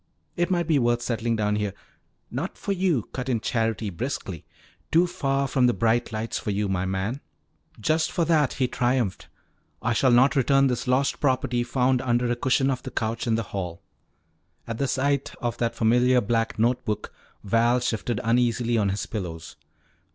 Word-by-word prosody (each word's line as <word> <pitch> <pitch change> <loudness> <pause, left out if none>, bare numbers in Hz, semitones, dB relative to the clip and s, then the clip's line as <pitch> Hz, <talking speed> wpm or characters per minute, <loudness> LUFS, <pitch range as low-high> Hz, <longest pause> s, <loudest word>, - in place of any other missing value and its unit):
It 175 +1 0
might 175 -2 +1
be 155 -3 +3
worth 120 -1 +1
settling 115 -1 -1
down 105 -1 0
here 105 -2 -2 0.3
" - - -44
"Not - - -5
for - - -3
you," 180 - +1
cut 130 0 -4
in 120 -3 +1
Charity 115 -2 -1
briskly. 95 - -5 0.5
"Too 170 +2 +5
far 140 -6 -1
from 130 -1 +3
the 120 - +2
bright 115 +1 +1
lights 110 +1 -3
for - - -5
you, 105 0 0
my 95 -1 -1
man." 95 +8 -2 0.6
"Just 155 +8 +1
for 170 - 0
that," 155 -4 +2
he 130 - 0
triumphed, 120 -5 -1 0.5
"I 115 +2 0
shall 130 +3 +3
not 125 +4 +5
return 135 +1 +4
this 125 -1 -1
lost 130 +2 +1
property 130 -3 +1
found 125 +1 +1
under 120 -1 +1
a - - +1
cushion 130 +2 +2
of 130 - -3
the - - -6
couch 115 +1 -2
in 115 - +2
the 115 - -1
hall." 90 -4 -4 0.8
At 115 -1 -5
the 140 - +1
sight 140 +1 0
of 120 -2 -3
that 115 -1 0
familiar 125 +3 +4
black 115 0 -1
note 120 +3 +1
book, 105 -1 -3 0.3
Val 115 +4 +3
shifted 120 -2 -2
uneasily 120 0 +2
on 100 -2 +1
his 100 +1 -2
pillows. 85 -6 -6
120 Hz, 185 wpm, -25 LUFS, 110-130 Hz, 0.8 s, Too